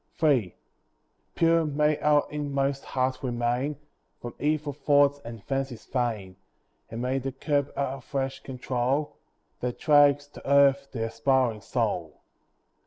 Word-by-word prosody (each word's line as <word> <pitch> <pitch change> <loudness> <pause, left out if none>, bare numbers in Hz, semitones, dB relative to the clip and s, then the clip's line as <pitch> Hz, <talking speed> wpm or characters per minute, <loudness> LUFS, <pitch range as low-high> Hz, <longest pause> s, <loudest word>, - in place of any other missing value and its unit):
III 125 - +3 0.8
Pure 165 -1 +3
may 150 0 +1
our 150 -1 +3
inmost 140 -2 -2
heart 130 0 -1
remain 125 +3 -1 0.4
From 120 - -7
evil 150 -1 0
thoughts 145 0 +3
and 115 -3 -9
fancies 135 -3 -3
vain; 110 -7 -2 0.5
And 115 +2 -5
may 130 +2 0
the 135 +1 -4
curb 140 +1 -1
our 135 -1 -2
flesh 135 0 -3
control, 130 +2 -2 0.4
That 125 0 -3
drags 145 -2 +4
to 140 - -9
earth 140 0 +5
the 115 -3 -3
aspiring 125 -1 +1
soul. - - -2
135 Hz, 125 wpm, -27 LUFS, 125-145 Hz, 0.8 s, earth